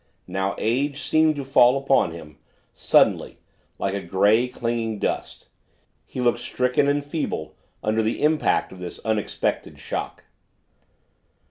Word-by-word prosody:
Now 95 0 -2
Age 140 +5 0
seemed 155 +1 +2
to 140 - -4
fall 130 -1 +5
upon 135 -7 +2
him, 80 -3 -11 0.3
suddenly, - - +2 0.4
like 95 - -2
a 100 - -2
gray, 100 +7 +3
clinging 115 -3 -2
dust - - -3 0.6
he - - -7
looked 120 -1 +2
stricken 125 +3 0
and 145 0 +1
feeble 145 - -4 0.3
under 110 +1 +1
the 110 +5 -1
impact 155 +1 +2
of 95 - -11
this 90 -1 -7
unexpected 110 -2 -2
shock. - - -5
120 Hz, 130 wpm, -23 LUFS, 100-140 Hz, 0.6 s, fall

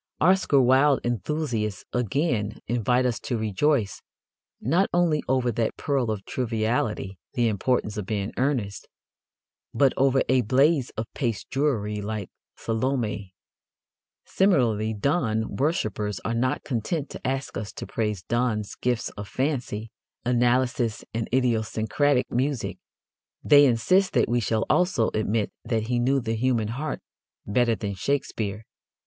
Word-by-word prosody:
Oscar 180 -5 +4
Wilde 130 +2 +4
enthusiasts, 120 -4 -2
again, 125 - 0
invite 125 +2 +1
us 120 -3 0
to 120 - -3
rejoice, 110 +1 0 0.6
not 185 +4 +2
only 170 -4 +2
over 130 -2 +2
that 115 0 -1
pearl 135 -5 0
of 105 -3 -3
triviality, 110 -5 -1 0.2
The 120 -1 +2
Importance 110 0 0
of 100 -3 -4
Being 105 -2 -2
Earnest, 125 -7 -1 0.9
but 135 +2 +4
over 135 0 +3
a 130 0 +4
blaze 135 +4 +3
of 110 - -2
paste 115 -7 -3
jewelry 110 -7 0
like 105 -2 -4 0.3
Salomé. 110 -5 -2 0.9
Similarly, 115 - +2
Donne 110 -2 0
worshippers 110 - -1
are 115 - 0
not 125 +2 0
content 140 +5 -2
to - - -6
ask 135 +1 -2
us 105 0 -4
to - - -6
praise 105 -4 -2
Donne's 120 -3 -1
gifts 120 -2 -1
of 100 0 -8
fancy, 120 -3 -2 0.3
analysis 120 -1 +1
and 115 0 -2
idiosyncratic 120 +2 +1
music. 130 -1 -1 0.6
They 145 -1 +7
insist 160 +12 +2
that - - +3
we 120 +1 +1
shall 110 0 0
also 180 -11 +2
admit 110 0 0
that 115 -1 -1
he 120 -1 +1
knew 135 +3 +2
the 115 -3 -2
human 115 -2 +1
heart 140 +7 -4 0.4
better 115 +2 +2
than 100 -2 -4
Shakespeare. 110 -2 -2
120 Hz, 130 wpm, -25 LUFS, 110-135 Hz, 0.9 s, They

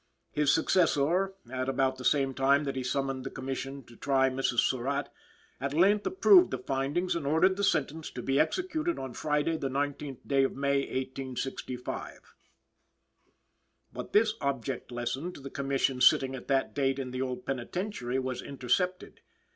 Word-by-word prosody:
His 150 -1 +2
successor, 175 +2 +2 0.2
at 130 0 -2
about 135 -1 +1
the - - -7
same 135 +1 +2
time 140 +2 +3
that 135 -2 -3
he 130 - -2
summoned 135 0 -1
the 135 - -4
Commission 135 +1 -5
to 120 - -16
try 135 +1 +2
Mrs. 130 -2 +1
Surratt, 135 +2 -1 0.5
at 140 +2 -3
length 200 +5 +4
approved 375 -1 +6
the - - -2
findings 140 +7 -1
and 155 -5 -3
ordered 170 +6 +4
the 200 - -2
sentence 155 -3 0
to 125 - -7
be 135 +1 +1
executed 335 - 0
on 130 -2 -5
Friday, 150 +4 0
the 135 - -2
19th 140 -1 -3
day 135 -1 +3
of 135 - 0
May, 140 +1 +1
1865. 130 -1 -5 1.6
But - - -7
this 215 +1 +4
object 135 -2 -3
lesson 120 +8 -3
to - - -11
the 135 0 -8
Commission 135 -2 0
sitting 130 +1 +5
at 125 - -9
that 135 -1 +1
date 135 -2 +1
in 130 -2 -4
the 130 +1 -3
old 130 -1 -3
Penitentiary 135 - -3
was 130 -1 -2
intercepted. 180 +8 -2
135 Hz, 165 wpm, -29 LUFS, 130-155 Hz, 1.6 s, approved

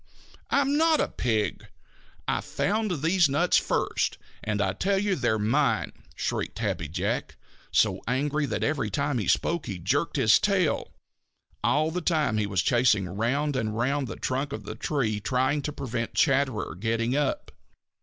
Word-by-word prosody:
"I'm 280 +1 +2
not 320 0 +4
a - - +2
pig! 110 -4 -1 0.6
I - - 0
found 205 -7 -1
these 170 -1 +4
nuts 150 +6 +3
first - - 0 0.3
and 105 -1 -1
I 95 -2 +1
tell 195 - 0
you 200 0 +1
they're 120 -8 +1
mine!" 110 +2 +1 0.2
shrieked - - -3
Happy - - -2
Jack, - - -2 0.4
so - - +2
angry 145 +4 0
that - - -2
every 145 -8 0
time 140 +4 -1
he 105 - -3
spoke 170 -1 +1
he 95 - -4
jerked 120 - 0
his 120 -7 +5
tail. 195 -6 +1
And - - -7
all 155 +2 +2
the 180 +2 -2
time 150 -10 +1
he 105 - 0
was 95 -3 0
chasing 120 -6 +3
round 130 +9 -1
and 110 -4 -2
round 135 +3 0
the - - -6
trunk 135 +2 -2
of - - -5
the - - -6
tree 115 -8 -1
trying 130 +6 0
to 150 - -3
prevent 120 -4 -4
Chatterer 130 -10 +1
getting 115 +6 -1
up. 145 -1 -1
135 Hz, 165 wpm, -27 LUFS, 110-155 Hz, 0.6 s, his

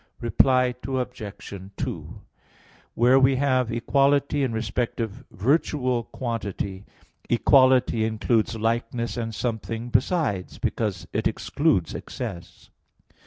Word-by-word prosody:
Reply 125 +1 +3
Obj. 125 -7 -5 0.2
2: - - -5 0.7
Where 125 +3 +5
we 135 0 +4
have 130 -3 +1
equality 140 +4 +2
in 130 -3 +1
respect 115 +2 -2
of 110 -3 -4
virtual 125 - +1
quantity, 105 -5 -4 0.4
equality 130 -1 +4
includes 110 +1 +1
likeness 115 +1 -1
and 115 -2 -4
something 115 +1 -3
besides, 120 - 0
because 105 -6 -2
it - - +1
excludes 145 - 0
excess. 100 -9 -7
120 Hz, 100 wpm, -25 LUFS, 110-130 Hz, 0.7 s, Where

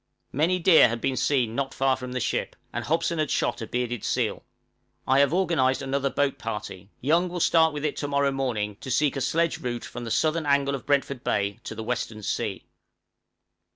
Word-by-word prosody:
Many 165 +7 +2
deer 165 -7 +6
had 115 +1 -3
been 130 +3 -1
seen 125 -5 +1
not 135 +2 -2
far 135 0 +2
from 125 0 -7
the 125 - -1
ship, - - -2 0.2
and - - -3
Hobson 165 +1 0
had 155 - 0
shot - - 0
a 110 - -4
bearded 120 -1 -2
seal. - - -1 0.6
I 135 +1 +4
have 140 0 +4
organized 160 -8 +1
another 140 +1 0
boat 140 0 0
party; 105 -4 -6
Young 170 +7 +2
will 175 0 -4
start 160 -1 +4
with 150 0 -4
it 150 - -2
to 145 - -2
morrow 140 0 +1
morning 115 -7 -2
to 130 +2 -9
seek 140 +3 +2
a 135 - -2
sledge 165 +5 +1
route 120 -2 -4
from 120 - -7
the 115 - -5
southern 155 +5 +1
angle 140 -1 +2
of 135 - -5
Brentford 140 -2 0
Bay 100 0 -1
to - - -6
the 110 - -5
western 110 -2 -3
sea. - - -3
135 Hz, 205 wpm, -26 LUFS, 120-150 Hz, 0.6 s, deer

